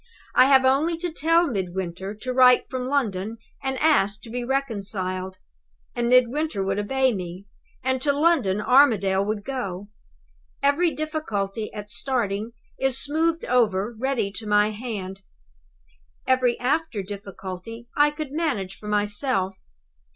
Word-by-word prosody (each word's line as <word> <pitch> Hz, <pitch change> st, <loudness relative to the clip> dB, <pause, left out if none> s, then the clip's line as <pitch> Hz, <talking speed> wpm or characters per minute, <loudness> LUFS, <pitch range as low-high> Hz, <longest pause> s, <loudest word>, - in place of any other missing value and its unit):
I -, -, +7 dB
have 265 Hz, -1 st, +5 dB
only 295 Hz, +6 st, +2 dB
to 350 Hz, 0 st, -3 dB
tell 330 Hz, +2 st, +3 dB
Midwinter 190 Hz, -, -4 dB
to 255 Hz, +4 st, -5 dB
write 250 Hz, -1 st, +6 dB
from 255 Hz, -1 st, -3 dB
London, 225 Hz, -6 st, -1 dB, 0.2 s
and 265 Hz, -1 st, -2 dB
ask 215 Hz, -11 st, +2 dB
to 225 Hz, -, -10 dB
be 245 Hz, +1 st, -3 dB
reconciled; 195 Hz, -8 st, -2 dB, 0.6 s
and 240 Hz, 0 st, 0 dB
Midwinter 255 Hz, -1 st, +2 dB
would 195 Hz, +1 st, -1 dB
obey 260 Hz, +4 st, +1 dB
me 180 Hz, 0 st, -6 dB, 0.4 s
and 260 Hz, 0 st, 0 dB
to 285 Hz, -, +3 dB
London 285 Hz, -, +2 dB
Armadale 210 Hz, -6 st, +4 dB
would 210 Hz, 0 st, -3 dB
go. 205 Hz, -7 st, -4 dB, 0.7 s
Every 285 Hz, +5 st, +3 dB
difficulty, 225 Hz, -11 st, -3 dB
at 210 Hz, -1 st, -8 dB
starting, 235 Hz, -3 st, -2 dB, 0.3 s
is 265 Hz, -1 st, +1 dB
smoothed 320 Hz, +3 st, 0 dB
over 225 Hz, -3 st, +1 dB
ready 235 Hz, -4 st, -1 dB
to 220 Hz, +1 st, -7 dB
my 210 Hz, 0 st, +3 dB
hand. 205 Hz, -4 st, -6 dB, 1.0 s
Every 255 Hz, -2 st, +2 dB
after 260 Hz, -4 st, -1 dB
difficulty 200 Hz, +3 st, -8 dB
I 295 Hz, 0 st, +5 dB
could 295 Hz, -2 st, -6 dB
manage 215 Hz, -, -2 dB
for 210 Hz, -, -10 dB
myself. 205 Hz, -1 st, +1 dB
235 Hz, 135 wpm, -24 LUFS, 200-270 Hz, 1.0 s, I